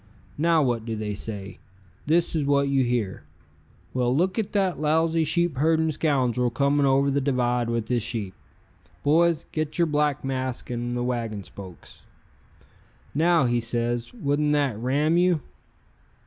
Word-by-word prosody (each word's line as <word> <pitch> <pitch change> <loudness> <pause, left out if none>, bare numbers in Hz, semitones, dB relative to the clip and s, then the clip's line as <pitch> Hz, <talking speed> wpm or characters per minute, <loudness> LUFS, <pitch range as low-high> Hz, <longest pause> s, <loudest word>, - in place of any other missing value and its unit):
Now 165 -1 +3
what 120 -4 0
do 115 -1 -4
they 105 -1 -3
say? 100 -1 -6 0.5
This 165 +2 +2
is 155 - +1
what 140 0 +2
you 135 -1 +2
hear: 120 -6 -1 0.7
'Well, 125 0 +1
look 185 +6 +1
at 215 - -2
that 195 -3 +1
lousy 160 +2 +2
sheepherding 160 0 +1
scoundrel 130 -5 +1
coming 140 +4 +2
over 135 +1 +3
the 140 +1 +1
divide 125 -3 0
with 115 -2 -2
his 120 -2 0
sheep. 105 -4 -3 0.7
Boys, 165 +1 +3
get 155 -1 -3
your 170 - +4
black 150 -2 0
masks 130 -2 -3
and 120 0 -3
the 120 0 -2
wagon 115 -5 -3
spokes.' 95 -3 -13 1.1
"Now," 165 0 +3
he 120 0 +1
says, 120 0 -2
"wouldn't 150 -8 0
that 140 -6 +1
Ram 145 +7 +1
you? 175 -3 +3
140 Hz, 150 wpm, -25 LUFS, 120-155 Hz, 1.1 s, your